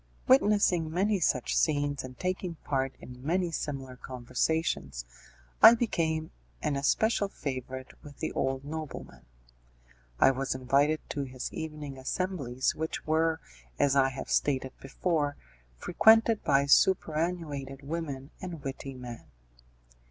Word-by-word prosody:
Witnessing 180 -1 +4
many 195 +5 +1
such 125 -7 +1
scenes, 145 -2 +1
and 130 0 -9
taking 185 -1 -2
part 135 -1 -1
in 125 0 -11
many 175 +3 0
similar 135 -5 -4
conversations, 125 - -2 0.6
I 230 - +11
became 160 -9 -1 0.3
an 145 - 0
especial 200 +10 +2
favourite 130 -6 -6
with 145 -2 -12
the - - -3
old 135 0 -1
nobleman. 145 - -7 0.9
I - - +7
was 135 0 -2
invited 140 +4 +2
to 140 -1 -2
his 130 -1 -6
evening 150 -4 -6
assemblies 135 -4 -1
which 160 +1 -4
were, 160 +1 +1 0.4
as 140 -1 +3
I 135 -1 +4
have 135 0 -7
stated 130 -2 +1
before, 145 +1 -1 0.4
frequented 225 - +4
by 140 -1 +3
superannuated 155 -4 +1
women 145 -2 -5
and 170 -5 -6
witty 135 0 -6
men. 125 -2 -8
145 Hz, 120 wpm, -29 LUFS, 130-165 Hz, 0.9 s, I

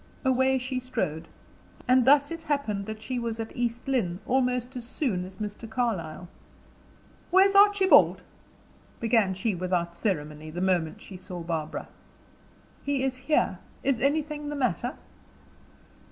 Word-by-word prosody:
Away 260 0 +3
she 255 0 -3
strode. 170 -10 -3 0.6
And 255 -1 +5
thus 285 +2 +5
it 330 0 -5
happened 280 -11 -2
that 220 0 -6
she 255 +1 -2
was 230 -1 -3
at 225 0 -5
East 240 0 -2
Lynne 200 -10 0
almost 250 0 0
as 245 - -5
soon 235 - -1
as 185 +1 -9
Mr. 210 +2 -6
Carlyle. 190 -8 -2 1.0
"Where's 385 +2 +5
Archibald?" 400 -1 +6 0.8
began 225 -4 +2
she, 200 +3 -1
without 175 -1 -1
ceremony, 155 -6 -3
the 165 +3 -6
moment 180 -4 0
she 190 - -10
saw 180 -1 -7
Barbara. 165 -2 -4 1.0
"He 280 -2 0
is 265 -1 0
here. 265 +4 0 0.2
Is 275 -4 +1
anything 295 +2 0
the 295 - -3
matter?" 250 -2 -1
235 Hz, 140 wpm, -27 LUFS, 185-265 Hz, 1.0 s, Archibald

